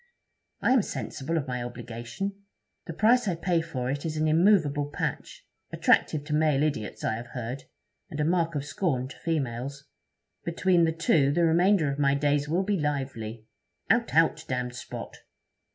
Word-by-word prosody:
I - - +3
am 260 -2 +5
sensible 165 -4 -3
of 145 -3 -2
my 125 -1 -3
obligation. 120 - -5 0.5
The 165 - -4
price 230 +6 +3
I 180 - +1
pay 170 0 +1
for 130 -7 -4
it 145 +1 -3
is 155 -1 -3
an 155 0 +1
immovable 155 -4 +3
patch - - -4 0.3
attractive 150 -2 +2
to 150 0 -4
male 150 -2 +3
idiots, 145 -9 -2
I - - +1
have 120 +1 -8
heard, 125 +2 -6 0.4
and 155 -4 -6
a 150 - +2
mark 165 -1 +1
of 140 -1 -2
scorn 135 -7 -1
to - - -12
females. 140 -3 -3 0.6
Between 170 0 +2
the 160 - +1
two 155 -3 +2
the 170 +4 +2
remainder 170 -1 +3
of 140 - -5
my 140 -1 +3
days 145 0 +1
will 175 +5 +1
be 200 -1 0
lively. 130 -7 -3 0.5
"Out, - - +1
out, - - +3
damned 125 -1 -2
spot!" 125 - -8
150 Hz, 170 wpm, -27 LUFS, 130-165 Hz, 0.6 s, am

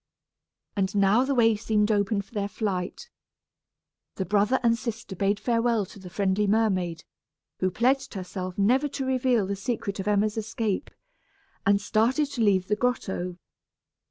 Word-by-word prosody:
And 195 -1 -1
now 200 +4 +4
the 275 0 0
way 225 -2 +4
seemed 210 0 +1
open 200 0 +1
for 195 - -26
their 205 -2 -1
flight. 205 - -4 1.0
The 190 - -2
brother 210 +6 +2
and 230 -1 +4
sister 230 -4 -5
bade 200 +2 +1
farewell 230 -1 +1
to 200 - -14
the 185 -1 -10
friendly 195 +2 +1
mermaid, 190 -6 +1 0.6
who 185 - +2
pledged 255 +8 +1
herself 185 -1 -5
never 250 +8 +3
to 275 -1 -4
reveal 255 -4 +2
the 200 +1 -2
secret 200 -1 -3
of 195 - -4
Emma's 210 +1 +1
escape, 220 -1 -2 0.8
and 200 0 +5
started 235 +8 +1
to 250 - -3
leave 190 -4 +3
the 210 - +2
grotto. 190 -7 -2
210 Hz, 155 wpm, -26 LUFS, 195-230 Hz, 1.0 s, and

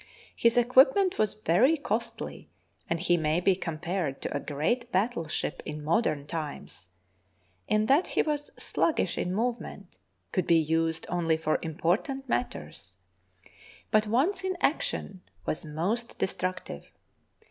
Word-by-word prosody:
His 235 +1 +3
equipment 265 +10 +5
was 215 -2 +1
very 215 - +3
costly, 235 -5 -4 0.4
and 165 - 0
he 175 0 +3
may 155 +1 +1
be 185 +1 +3
com 165 -4 -4
pared 170 -4 -2
to - - -3
a - - +1
great 235 - -1
battleship 190 -6 -1
in 150 0 -6
modern 155 -4 +1
times 145 - -6 0.8
in 215 0 +2
that 280 +10 +4
he - - +1
was 295 -1 -2
sluggish 310 - 0
in 180 - -1
movement, 215 - -3 0.3
could 185 - 0
be 170 - +6
used 160 +1 +1
only 165 -2 +1
for 155 -1 0
important 185 - -1
matters, 245 - -4 0.9
but 215 -1 +4
once 325 - +1
in 375 -1 -1
action 190 - -1 0.2
was - - -2
most 185 +11 -2
destructive. 185 - -3
185 Hz, 135 wpm, -28 LUFS, 160-240 Hz, 0.9 s, be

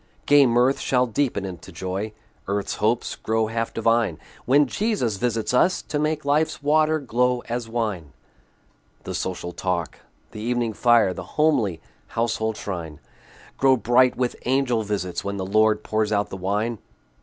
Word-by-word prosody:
Gay 145 -2 +6
mirth 125 +3 +3
shall 125 -1 +2
deepen 120 -4 -1
into 90 -4 -8
joy, 95 +3 -4 0.4
Earth's 100 0 -2
hopes 110 +3 0
grow 110 0 0
half 115 +1 -2
divine, 115 -6 +1 0.3
When 145 +3 +5
Jesus 140 - -1
visits 115 +1 -1
us, 180 +9 +3
to 150 - -3
make 150 0 -1
Life's 150 +1 +1
water 155 +2 +3
glow 125 -2 0
as 120 -1 -3
wine. 105 -10 -3 0.9
The - - -5
social 90 -1 -3
talk, 90 -3 -3 0.3
the 105 - -8
evening 120 0 -1
fire, 115 -4 +4
The - - -6 0.2
homely 130 - +2 0.4
household 110 -1 0
shrine, 85 -6 -6 0.6
Grow 135 -1 +5
bright 125 +2 +3
with 125 -1 -1
angel 130 -3 +1
visits, 100 -4 -3
when 100 0 -3
The 95 - -3
Lord 110 +2 +2
pours 110 -1 0
out 100 -1 0
the - - -4
wine. 105 +4 -1
115 Hz, 155 wpm, -23 LUFS, 100-125 Hz, 0.9 s, Gay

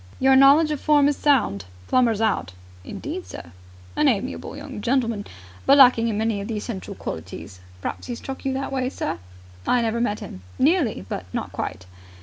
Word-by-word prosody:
"Your 265 0 +5
knowledge 280 +4 +6
of 300 - -3
form 295 -2 +4
was 290 0 +3
sound. 225 - +2 0.2
Plummer's 230 -4 +2
out!" 210 - 0 0.3
"Indeed, 335 - -6
sir! 85 - -9 0.4
An - - +3
amiable 85 -1 -1
young - - -7
gentleman, 230 -3 0 0.4
but 275 - +7
lacking 245 -4 +7
in 215 -3 -1
many 220 -2 0
of 200 - -6
the 225 - -3
essential 205 -2 -6
qualities. 90 - -7 0.2
Perhaps - - -5
he 245 - -3
struck 265 +3 -7
you 270 - 0
that 270 +1 -3
way, 260 -1 -1
sir?" 175 - -4 0.5
"I 245 -1 +3
never 230 +1 0
met 210 -3 0
him. 95 - -9 0.2
Nearly, 280 - +2
but 90 - -5
not - - -4
quite!" 90 - -5
235 Hz, 180 wpm, -23 LUFS, 205-270 Hz, 0.5 s, but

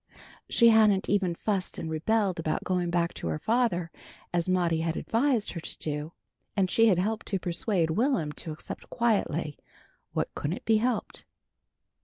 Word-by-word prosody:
She 235 -1 +6
hadn't 215 -3 +4
even 190 -4 +1
fussed 195 0 -2
and 165 - -4
rebelled 185 +4 0
about 155 -1 -1
going 180 -2 0
back 170 0 0
to - - -5
her 80 -1 -1
father 220 - 0 0.4
as 175 +1 0
Maudie 175 -3 +2
had 165 0 -1
advised 235 -2 +1
her 170 - -5
to 165 - -7
do, 150 +1 -4 0.4
and 185 -2 +2
she 225 0 +5
had 190 -5 +4
helped 215 +5 -1
to 195 - 0
persuade 175 -1 0
Will'm 225 - +1
to 155 +2 -6
accept 155 - -8
quietly 175 - 0 0.5
what - - -2
couldn't 160 +6 -4
be 220 -1 +4
helped. 235 +1 -2
185 Hz, 165 wpm, -28 LUFS, 165-220 Hz, 0.5 s, She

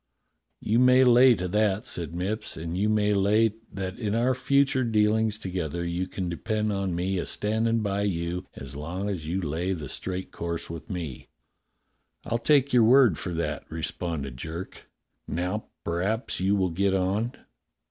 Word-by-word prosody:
"You 115 +3 +1
may 125 +1 +6
lay 125 0 +7
to 90 -2 -3
that," 105 0 +1
said 85 -1 -3
Mipps, 105 +5 -3
"and 80 +1 -4
you 100 +3 +1
may 105 -1 +2
lay 105 +2 +3 0.2
that 95 0 -5
in 105 -3 -1
our 120 +3 +2
future 140 +1 +2
dealings 110 -1 +2
together 85 -4 -3
you 85 +2 -2
can 95 -1 -4
depend 105 +5 -1
on 95 -3 -1
me 90 +2 -1
a - - -2
standin' 110 +2 0
by 100 -1 -1
you 90 -2 -2
as 65 0 -8
long 90 +7 -4
as 80 -6 -5
you 90 +4 -1
lay 85 +3 -1
the 75 -6 -6
straight 95 0 -4
course 85 -1 -4
with 85 -2 -8
me." 80 -8 -5 1.0
"I'll 115 - -1
take 140 +1 +3
your 120 -2 +6
word 120 - +6
for 90 - -4
that," 75 -4 -3
responded 80 -4 -4
Jerk. 80 +6 -7 0.4
"Now 90 +6 -2 0.2
p'raps 100 +8 -1
you 95 +2 +2
will 95 -3 +1
get 95 +3 +1
on. 100 +6 0
95 Hz, 170 wpm, -27 LUFS, 85-110 Hz, 1.0 s, lay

